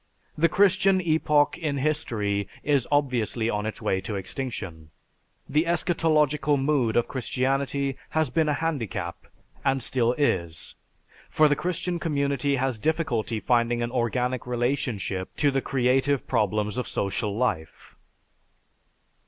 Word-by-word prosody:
The 165 +2 +3
Christian 195 +1 +4
epoch 155 -3 +2
in 150 -4 -1
history 105 -9 -1 0.2
is 140 -4 +2
obviously 120 -5 +1
on 105 +1 -2
its 110 - -6
way 95 - 0
to 100 +2 -4
extinction. 95 - -5 0.6
The 150 +4 +2
eschatological 150 -4 +2
mood 135 -5 +1
of 120 - +2
Christianity 135 +2 -1
has 155 -4 0
been 155 +3 +2
a 150 - +2
handicap, 115 - -3 0.4
and 135 -1 +2
still 120 -1 +1
is, 85 - -1 0.6
for 155 - +4
the 145 - +2
Christian 180 +1 -2
community 140 -3 0
has 130 -3 -1
difficulty 125 -7 -1
finding 120 0 +1
an 120 - -3
organic 125 0 -1
relationship 120 -6 -2
to 145 -1 +2
the 135 0 0
creative 135 +1 +1
problems 105 +2 0
of 125 - -2
social 100 +1 -2
life." 80 -11 -3
130 Hz, 130 wpm, -26 LUFS, 115-150 Hz, 0.6 s, Christian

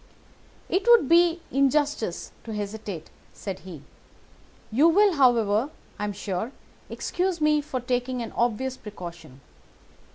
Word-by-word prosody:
"'It 380 +2 +1
would 475 - +7
be 340 +1 +4
injustice 275 - +1
to 225 -2 -6
hesitate,' 205 -4 -5 0.2
said 195 -2 -6
he. 170 -6 -10 0.9
'You 285 +9 +5
will, 400 +3 +5
however, 240 -4 +3 0.3
I 210 - -1
am 205 - -3
sure, 200 +4 -4 0.4
excuse 360 -1 -2
me 300 -1 +3
for 285 -3 -4
taking 250 +1 -1
an 230 - -7
obvious 245 +3 -1
precaution. 175 -10 -10
245 Hz, 125 wpm, -26 LUFS, 205-300 Hz, 0.9 s, would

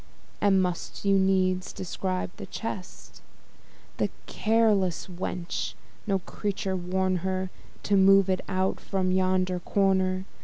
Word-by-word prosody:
And 195 -2 +4
must 180 +2 -4
you 195 -1 +4
needs 185 -1 +2
describe 185 0 -3
the - - -7
chest? 200 -5 -7 0.8
That - - +1 0.2
careless 215 -5 +2
wench! 175 - -4 0.3
no 195 - +2
creature 195 0 -3
warn 185 +1 0
her 185 +1 -2 0.3
To 205 - +2
move 195 0 +6
it 185 -1 +1
out 190 0 0
from 185 -1 -1
yonder 185 -1 +1
corner! 190 0 +1
185 Hz, 120 wpm, -27 LUFS, 185-195 Hz, 0.8 s, move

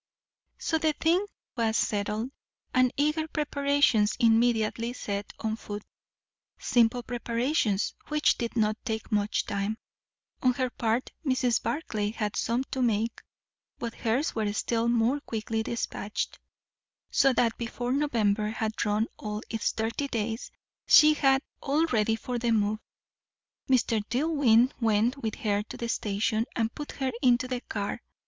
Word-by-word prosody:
So 320 - 0
the 315 -1 +2
thing 345 +7 +2 0.3
was 225 -2 +1
settled, 210 +5 -1 0.4
and 255 -1 +4
eager 305 +2 +1
preparations 285 -8 +2
immediately 230 0 +2
set 200 -4 -4
on 220 0 -2
foot. 205 -2 -7 0.7
Simple 240 0 +2
preparations, 235 -2 0
which 300 0 +3
did 235 -1 -4
not 215 -1 +2
take 220 -3 -4
much 205 0 +1
time. 200 +2 -2 0.6
On 255 -1 +4
her 255 -1 -1
part 230 +2 -1
Mrs. 255 -4 +1
Barclay 215 -9 -2
had 210 -1 -3
some 235 +3 0
to 265 -2 -1
make, 230 -1 0 0.6
but 235 -1 -4
hers 245 +7 0
were 215 -2 0
still 230 +2 0
more 235 +4 +2
quickly 225 -4 -3
despatched; 220 -2 -3 0.7
so 270 - +4
that 230 -1 +2
before 245 +1 -3
November 220 -7 +1
had 220 0 -2
run 210 +1 +1
all 210 0 -5
its 225 - 0
thirty 225 +6 -2
days, 225 -1 -3 0.4
she 305 0 +8
had 270 -2 +3 0.2
all 300 +3 +2
ready 225 -6 +1
for 245 +2 -4
the 235 0 0
move. 215 -1 +2 0.9
Mr. 235 -4 +3
Dillwyn 255 -3 +3
went 225 +3 +2
with 220 -2 -2
her 205 -2 0
to 210 - -9
the 235 - -4
station 215 +2 0
and 225 -1 0
put 295 - -7
her 265 -1 -1
into 250 -1 +3
the 250 -1 -3
car. 205 -4 -4
230 Hz, 140 wpm, -28 LUFS, 220-260 Hz, 0.9 s, she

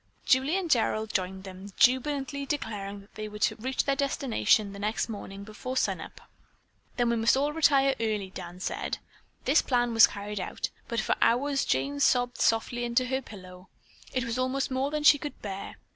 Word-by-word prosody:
Julie 270 +7 +3
and 380 -3 -2
Gerald 220 -6 +1
joined 190 0 -2
them, 190 +1 -10
jubilantly 280 +2 +2
declaring 205 -8 -4
that 200 - -21
they 215 0 -5
were 210 - -8
to 210 - +1
reach 260 +4 -1
their 275 - +1
destination 230 - +1
the 200 - -9
next 215 +3 -1
morning 200 -2 -7
before 220 +5 -6
sun - - 0
up. - - -11 0.8
"Then 240 -1 +2
we - - +2
must 225 +3 +3
all 290 +2 0
retire 275 -4 +4
early," 210 -4 -1
Dan 175 -1 -8
said. - - -3 0.5
This 280 +4 +5
plan 245 -2 +1
was 225 -1 +8
carried 205 0 -6
out, 185 - -4 0.2
but 235 -1 -1
for - - +1
hours 275 +4 +2
Jane 140 +2 0
sobbed 245 - +2
softly 230 +2 +1
into 240 +1 +1
her 265 0 0
pillow. 185 -5 -12 0.4
It 255 - -1
was 235 +2 -3
almost 260 +1 -1
more 260 +2 0
than 300 0 -2
she 290 -1 +7
could 295 - -7
bear. 195 -1 -6
235 Hz, 190 wpm, -28 LUFS, 200-270 Hz, 0.8 s, was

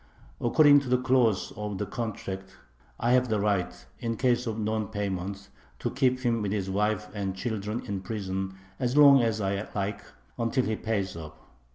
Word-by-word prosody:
According 145 +4 +6
to 140 -3 -6
the 125 - +4
clause 125 -5 +2
of 105 -1 -4
the 105 - -2
contract 95 -4 -5 0.4
I 120 - +1
have 125 -1 +3
the 110 -1 +1
right, 100 -3 -1
in 115 -1 -2
case 125 0 +1
of 110 -1 -2
non 110 -1 -1
payment, 100 -1 -4 0.3
to - - -3
keep 130 -1 +1
him 120 -3 +1
with 100 -2 -1
his 95 -2 -2
wife 105 +2 0
and 100 -3 -3
children 110 +1 -3
in 100 -2 -3
prison 95 -2 -4 0.2
as 125 +2 0
long 140 -2 +8
as 115 -2 0
I 100 +1 -1
like, 100 +1 -2 0.4
until 120 +2 +1
he 110 - 0
pays 100 -5 -2
up. 80 -1 -10
105 Hz, 180 wpm, -28 LUFS, 100-120 Hz, 0.4 s, long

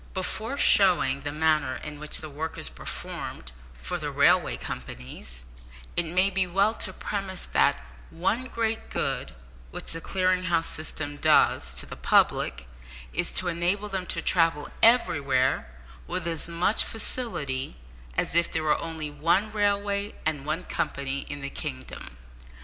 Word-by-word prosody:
Before 220 +7 -2
showing 170 - +5
the 145 +1 -3
manner 155 -3 +2
in 150 +1 -7
which 150 0 -2
the 155 - -6
work 155 +3 -5
is - - -2
performed 65 - -6 0.3
for - - -3
the - - -3
railway - - +4
companies, 65 0 -7 0.5
it 175 - +1
may 185 +4 +3
be 190 -2 +1
well 195 +5 +3
to - - -2
premise 195 -2 -3
that - - +3 0.3
one 200 +9 0
great 225 -3 -2
good - - -1 0.3
which - - -1
the 165 - -3
Clearing 185 0 +1
House 165 -2 +2
system 145 -2 -3
does 60 - +4
to - - -1
the - - -8
public, - - +2 0.5
is - - 0
to 185 - +1
enable 175 +5 0
them 190 -2 -3
to 165 - -2
travel 165 -4 +2
everywhere 140 - +3 0.4
with - - -3
as 165 -2 -2
much 170 +5 +2
facility 145 - -2 0.4
as - - 0
if 170 +1 +3
there 160 - -1
were 150 -1 +2
only 160 -2 -5
one 170 +8 +2
railway 205 -1 0
and 150 -3 -1
one 160 +4 -1
company 140 -3 -2
in 145 -1 -5
the 140 0 -4
kingdom. 65 -1 -6
165 Hz, 150 wpm, -27 LUFS, 145-195 Hz, 0.5 s, showing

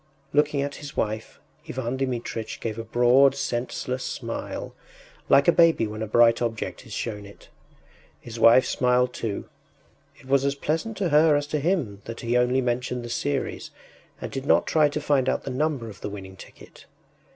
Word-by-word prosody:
” 140 0 -37
Looking 145 -1 +2
at 140 0 -5
his 145 -2 -9
wife, 110 +1 -3 0.3
Ivan 125 0 -3
Dmitritch 120 -4 -4
gave 115 -1 -4
a - - -4
broad, 125 +4 +4
senseless 125 0 -3
smile, - - -5 0.6
like 140 0 +5
a - - +8
baby 165 -8 +4
when 110 0 -6
a 110 - -2
bright 115 +2 +4
object 115 -2 -4
is - - -14
shown 105 -3 -4
it. 100 0 -15 0.7
His 115 -1 -9
wife 115 +3 +7
smiled 125 0 +1
too; 110 -5 -4 0.7
it - - -18
was 135 0 +2
as 140 0 0
pleasant 165 +10 -2
to 190 -4 0
her 150 0 +5
as 145 0 0
to 150 - +2
him 140 - -1
that 115 0 -7
he 120 +1 -1
only 125 +2 +3
mentioned 125 0 -2
the - - -7
series, 140 +3 -2 0.5
and - - -6
did 135 +1 -5
not - - +4
try 155 -2 +3
to 150 - -3
find 140 -3 +1
out - - -1
the - - -5
number 140 -3 -1
of 105 -3 -11
the - - -4
winning 95 -2 -9
ticket. - - -15
125 Hz, 185 wpm, -25 LUFS, 115-140 Hz, 0.7 s, a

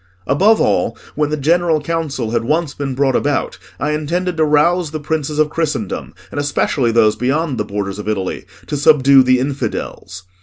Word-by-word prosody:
Above 200 +10 +3
all, 100 +3 +1 0.2
when 150 0 0
the 150 - -1
General 165 +2 +2
Council 145 -7 -3
had 115 -1 0
once 155 +4 0
been 135 -2 -4
brought 135 -1 +1
about, 145 -1 -1 0.2
I 145 +2 -1
intended 170 +4 -2
to 160 - +3
rouse 155 +3 +2
the 155 +1 -5
princes 150 0 -3
of 155 -1 +2
Christendom, 160 -3 -3 0.2
and - - -4
especially 140 -3 0
those 110 -2 +3
beyond 135 +1 -1
the 105 - -1
borders 100 -1 -4
of 105 - -7
Italy, 95 -3 -3 0.2
to 145 - -3
subdue 140 -1 +5
the 130 0 +3
infidels. 120 -8 -4
145 Hz, 180 wpm, -17 LUFS, 125-155 Hz, 0.2 s, subdue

